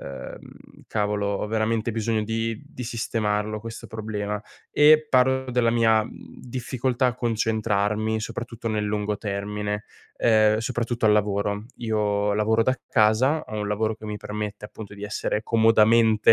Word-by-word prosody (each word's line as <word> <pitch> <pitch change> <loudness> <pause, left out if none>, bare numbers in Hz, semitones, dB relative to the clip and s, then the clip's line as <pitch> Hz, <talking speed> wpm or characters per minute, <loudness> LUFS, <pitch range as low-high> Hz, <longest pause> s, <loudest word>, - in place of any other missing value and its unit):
"Uhm, 70 - -10
cavolo, 105 -1 -1
ho 100 +1 -1
veramente 110 +1 0
bisogno 110 0 0
di 115 0 -2
di 125 -3 -8
sistemarlo 110 -2 -2
questo 115 +1 -8
problema". 105 -2 -4 0.3
E 155 +1 +6
parlo 130 0 +3
della 120 -2 +2
mia, 115 -2 +4
mhmm, - - -12
difficoltà 125 +1 -1
a 120 - -2
concentrarmi, 110 -2 0
soprattutto, 115 +1 -6
nel 105 -1 -1
lungo 105 0 -1
termine, 105 0 -3 0.3
ehm, 110 -2 +4
soprattutto 120 0 -1
al 105 - +6
lavoro. 105 0 0
Io 105 -3 0
lavoro 110 +2 +2
da 130 +3 0
casa, 120 +7 +3
ho 110 - -5
un 105 - -2
lavoro 110 +1 0
che 110 - -14
mi 105 0 -4
permette, 105 0 -5
appunto, 105 -1 -9
di 100 - -11
essere 105 +1 -2
comodamente, 110 -1 +5
110 Hz, 145 wpm, -24 LUFS, 105-115 Hz, 0.3 s, E